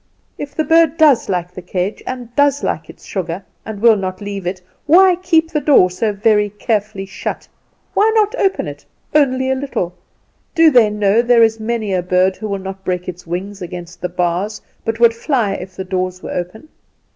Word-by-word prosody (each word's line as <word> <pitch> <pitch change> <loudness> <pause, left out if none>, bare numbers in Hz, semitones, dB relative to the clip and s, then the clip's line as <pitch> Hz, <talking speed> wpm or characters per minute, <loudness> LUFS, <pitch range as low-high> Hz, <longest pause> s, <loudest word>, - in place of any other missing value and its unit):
"If 285 -1 -7
the 315 - +1
bird 325 -1 +3
does 295 -9 +4
like 180 -1 -2
its 180 -1 -11
cage, 185 +3 -2
and 245 -2 -6
does 285 0 +2
like 160 -1 -2
its - - -14
sugar 185 0 -4 0.2
and 215 -2 -7
will 230 0 +6
not 185 -1 -4
leave 200 -3 -5
it, 185 +1 -3 0.3
why 365 +4 +6
keep 335 -3 +1
the 300 - 0
door 225 -13 +5
so 210 +4 -1
very 210 0 +2
carefully 210 -1 -2
shut? 195 - -6 0.5
Why 430 +2 +3
not 430 0 +3
open 390 -1 +1
it, - - -8 0.3
only 260 -3 +2
a - - +3
little? 260 -10 -3 0.6
Do 330 -2 +6
they 240 -5 +5
know 210 +1 +2
there 240 -1 +4
is 225 0 +2
many 220 -2 -2
a 185 - +1
bird 185 +2 +1
will 205 -2 -2
not 190 0 -8
break 180 -1 -3
its 180 -1 -8
wings 190 +4 -5
against 175 -1 -8
the 180 - -2
bars, 180 +4 -1 0.2
but 225 0 -3
would 235 -1 +6
fly 230 -3 0
if 185 -1 -7
the 190 - -4
doors 185 -1 -3
were - - -6
open?" 180 - -5
210 Hz, 195 wpm, -17 LUFS, 185-260 Hz, 0.6 s, will